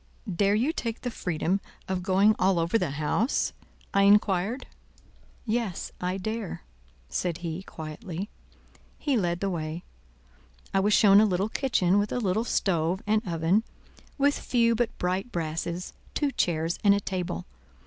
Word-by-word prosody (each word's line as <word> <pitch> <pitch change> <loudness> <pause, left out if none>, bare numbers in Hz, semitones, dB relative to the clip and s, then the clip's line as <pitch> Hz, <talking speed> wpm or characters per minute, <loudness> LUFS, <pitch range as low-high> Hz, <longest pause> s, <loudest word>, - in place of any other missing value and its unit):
"Dare 200 +3 +3
you 255 +9 +1
take 230 -7 -4
the 245 - -3
freedom 180 0 -1 0.3
of 185 -1 -1
going 195 +4 +4
all 190 -1 +3
over 165 +4 0
the 180 - 0
house?" 155 - 0 0.4
I 200 - +4
inquired. 200 +3 +3 0.8
"Yes, 220 -5 -2
I 180 +1 -1
dare," 215 0 -4 0.4
said 170 - -2
he, 165 +2 -3
quietly. 175 +3 -6 0.7
He 285 -3 0
led 175 -5 0
the 200 - 0
way. 160 0 -4 0.9
I 195 - +4
was 205 +2 +3
shown 200 -1 +7
a - - +5
little 195 +2 0
kitchen 205 -8 +2
with 205 0 -1
a - - -1
little 220 0 0
stove 180 -4 0
and 215 +1 +2
oven, 170 +4 +2 0.6
with 285 0 +2
few 235 -2 +2
but 230 0 -1
bright 185 +6 -1
brasses, 170 +2 -3 0.2
two 290 -2 +1
chairs 165 -7 0
and 200 -1 +6
a - - +1
table. 180 - -3
195 Hz, 150 wpm, -27 LUFS, 175-220 Hz, 0.9 s, shown